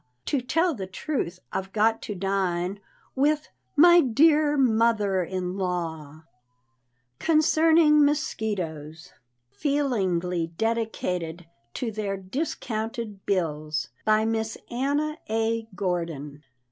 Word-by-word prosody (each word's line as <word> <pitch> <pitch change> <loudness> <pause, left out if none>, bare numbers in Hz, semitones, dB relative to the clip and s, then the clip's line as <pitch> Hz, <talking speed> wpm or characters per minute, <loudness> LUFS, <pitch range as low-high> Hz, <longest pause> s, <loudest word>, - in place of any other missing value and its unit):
To 280 - 0
tell 325 +7 +1
the 195 -8 -6
truth, 190 - -3 0.2
I've 190 0 -3
got 225 +1 +2
to 210 - -5
dine 190 0 -1 0.3
With 295 +3 +1 0.3
my 345 +2 +8
dear 295 +3 +4
mother 220 -6 +2
in 185 +1 -4
law!" 180 -3 -1
Harper's 150 -2 -12 1.0
Weekly. - - -10
CONCERNING 310 -1 +5
MOSQUITOES. 180 - -3 0.4
Feelingly 185 - 0
Dedicated 180 -7 -2 0.3
to 235 -3 -2
their 205 -2 -3
Discounted 220 - -4
Bills. 155 -5 -1
BY 215 0 +3
MISS 225 0 -1
ANNA 290 +5 -1
A. 225 0 0
GORDON. 165 -6 -3
215 Hz, 105 wpm, -26 LUFS, 180-275 Hz, 1.0 s, my